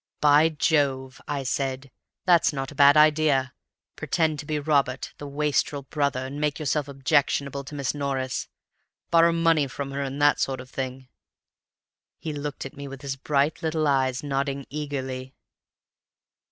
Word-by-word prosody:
'By 150 Hz, +2 st, +5 dB
Jove!' 140 Hz, -4 st, 0 dB
I 145 Hz, -2 st, -2 dB
said, 135 Hz, 0 st, -2 dB, 0.3 s
'that's 175 Hz, -3 st, +5 dB
not 135 Hz, -2 st, -4 dB
a 145 Hz, -, -1 dB
bad 140 Hz, +1 st, +8 dB
idea. 150 Hz, -4 st, +4 dB, 0.4 s
Pretend 160 Hz, -3 st, 0 dB
to 145 Hz, -, -7 dB
be 155 Hz, -, -1 dB
Robert, 140 Hz, -3 st, 0 dB
the 145 Hz, -, -6 dB
wastrel 145 Hz, 0 st, 0 dB
brother, 140 Hz, -2 st, -1 dB
and 140 Hz, +3 st, -6 dB
make 150 Hz, -1 st, 0 dB
yourself 150 Hz, -1 st, -1 dB
objectionable 140 Hz, 0 st, 0 dB
to 150 Hz, -, -8 dB
Miss 140 Hz, -3 st, -1 dB
Norris. 135 Hz, -3 st, -2 dB, 0.6 s
Borrow 170 Hz, 0 st, +6 dB
money 165 Hz, -3 st, +2 dB
from 140 Hz, +1 st, -5 dB
her, 140 Hz, +1 st, -3 dB
and 135 Hz, +1 st, -4 dB
that 145 Hz, 0 st, +4 dB
sort 135 Hz, -1 st, -1 dB
of 130 Hz, 0 st, -11 dB
thing.' 130 Hz, 0 st, -5 dB, 1.1 s
"He 155 Hz, -, -5 dB
looked 145 Hz, -1 st, -5 dB
at 135 Hz, -, -8 dB
me, 140 Hz, 0 st, -7 dB
with 135 Hz, +1 st, -9 dB
his 135 Hz, -1 st, -3 dB
bright 140 Hz, +2 st, 0 dB
little 155 Hz, -1 st, 0 dB
eyes, 130 Hz, -2 st, +1 dB
nodding 140 Hz, -1 st, -2 dB
eagerly. 130 Hz, -3 st, -5 dB
140 Hz, 155 wpm, -25 LUFS, 135-150 Hz, 1.1 s, bad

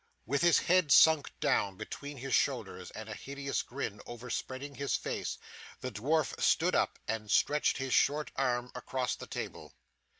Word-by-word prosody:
With 140 Hz, +5 st, 0 dB
his 170 Hz, -1 st, +6 dB
head 180 Hz, -4 st, +3 dB
sunk 160 Hz, +1 st, +6 dB
down 100 Hz, -2 st, +1 dB
between 140 Hz, +6 st, -7 dB
his 135 Hz, 0 st, -4 dB
shoulders, 90 Hz, -4 st, 0 dB
and 110 Hz, 0 st, -8 dB
a 110 Hz, -, -5 dB
hideous 140 Hz, +4 st, -3 dB
grin 115 Hz, -6 st, -5 dB
over 120 Hz, +1 st, -7 dB
spreading 135 Hz, +2 st, -4 dB
his 140 Hz, 0 st, -1 dB
face, -, -, -3 dB, 0.4 s
the 130 Hz, -, -4 dB
dwarf 145 Hz, +7 st, 0 dB
stood -, -, +3 dB
up -, -, +1 dB
and 110 Hz, -1 st, -3 dB
stretched 150 Hz, +7 st, +3 dB
his 135 Hz, -2 st, -2 dB
short 150 Hz, +2 st, +2 dB
arm 125 Hz, -2 st, 0 dB
across 125 Hz, 0 st, -2 dB
the -, -, -9 dB
table. -, -, -6 dB
130 Hz, 165 wpm, -32 LUFS, 120-145 Hz, 0.4 s, his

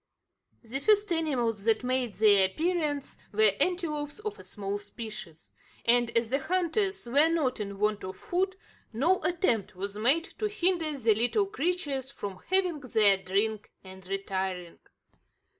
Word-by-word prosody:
The 240 Hz, +4 st, -4 dB
first 415 Hz, +2 st, +3 dB
animals 245 Hz, -10 st, 0 dB
that 225 Hz, +1 st, +3 dB
made 250 Hz, -3 st, -1 dB
their 205 Hz, -3 st, +5 dB
appearance 305 Hz, -, -2 dB
were 215 Hz, -1 st, +4 dB
antelopes 305 Hz, -5 st, 0 dB
of 425 Hz, 0 st, -6 dB
a -, -, -10 dB
small 200 Hz, -1 st, -4 dB
species; 205 Hz, -6 st, -9 dB, 0.3 s
and, 240 Hz, 0 st, +4 dB
as 230 Hz, 0 st, 0 dB
the 275 Hz, -, +2 dB
hunters 370 Hz, -, 0 dB
were 285 Hz, +7 st, +4 dB
not 300 Hz, -8 st, 0 dB
in 200 Hz, -1 st, -5 dB
want 210 Hz, 0 st, 0 dB
of 185 Hz, 0 st, -6 dB
food, 375 Hz, +2 st, -1 dB, 0.4 s
no 320 Hz, +12 st, +2 dB
attempt 260 Hz, -, 0 dB
was 200 Hz, +2 st, -5 dB
made 270 Hz, +9 st, +3 dB, 0.2 s
to 430 Hz, -, +1 dB
hinder 350 Hz, -7 st, 0 dB
the 230 Hz, -4 st, +3 dB
little 245 Hz, -, +2 dB
creatures 320 Hz, -8 st, -2 dB
from 200 Hz, -8 st, -7 dB
having 370 Hz, -4 st, +2 dB
their 220 Hz, -7 st, +4 dB
drink 200 Hz, +3 st, -1 dB
and 190 Hz, -1 st, -12 dB
retiring. 190 Hz, -2 st, -3 dB
250 Hz, 145 wpm, -29 LUFS, 205-335 Hz, 0.4 s, their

